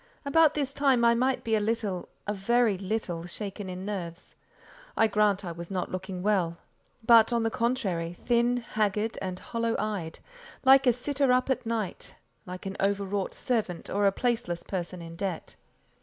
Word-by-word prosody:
About 310 +2 +5
this 280 -2 -1
time 270 -5 +3
I 235 - +6
might 255 +2 +1
be 225 - -1
a 220 - +4
little—a 205 -2 -3
very 225 +2 +2
little—shaken 195 0 -4
in 185 +1 -6
nerves. 180 -4 -5 0.6
I - - +5
grant 210 -2 +2
I 175 - -4
was 170 0 -8
not 185 -2 -3
looking 185 0 -5
well, 185 -5 +1 0.5
but, 230 -1 +7
on 235 -1 +1
the 225 - 0
contrary, 200 -10 -1
thin, 240 0 +2
haggard, 215 -2 -1
and 185 -1 -3
hollow 230 +3 -2
eyed; 195 -7 -3 0.5
like 270 0 +7
a - - +8
sitter 275 +2 +1
up 255 +1 +2
at 245 - -1
night, 220 -5 -3 0.3
like 180 +1 -7
an 195 0 -5
overwrought 200 0 -1
servant, 215 -8 -2
or 200 0 +3
a - - +4
placeless 210 -6 -1
person 180 -2 -4
in 165 0 -9
debt. 180 -1 -4
210 Hz, 165 wpm, -28 LUFS, 185-235 Hz, 0.6 s, a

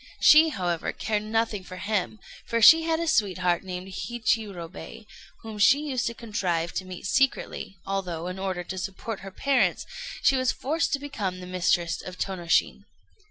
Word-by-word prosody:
She, 315 +1 +7
however, 175 - -2
cared 210 -1 -1
nothing 215 -2 -1
for 185 0 -10
him, 210 +2 -2 0.3
for 230 - 0
she 325 +9 +9
had 325 0 0
a 335 - -2
sweetheart 185 - +1
named 185 0 -6
Hichirobei, 220 -3 -3 0.4
whom 220 -2 -7
she 265 +9 +5
used 255 -2 -1
to 235 - -4
contrive 180 -8 -2
to 185 - -3
meet 185 0 -8
secretly, 265 -5 0
although, 180 -4 -3
in 180 +1 -5
order 190 -2 -2
to 185 +2 -6
support 195 +3 -5
her 195 - -8
parents, 275 +8 +1 0.4
she 275 - +5
was 255 -1 +2
forced 315 +5 -1
to 280 - +1
become 210 -11 -4
the 180 - -8
mistress 175 -2 0
of 185 0 -9
Tônoshin. 175 -4 0
195 Hz, 165 wpm, -26 LUFS, 180-235 Hz, 0.4 s, she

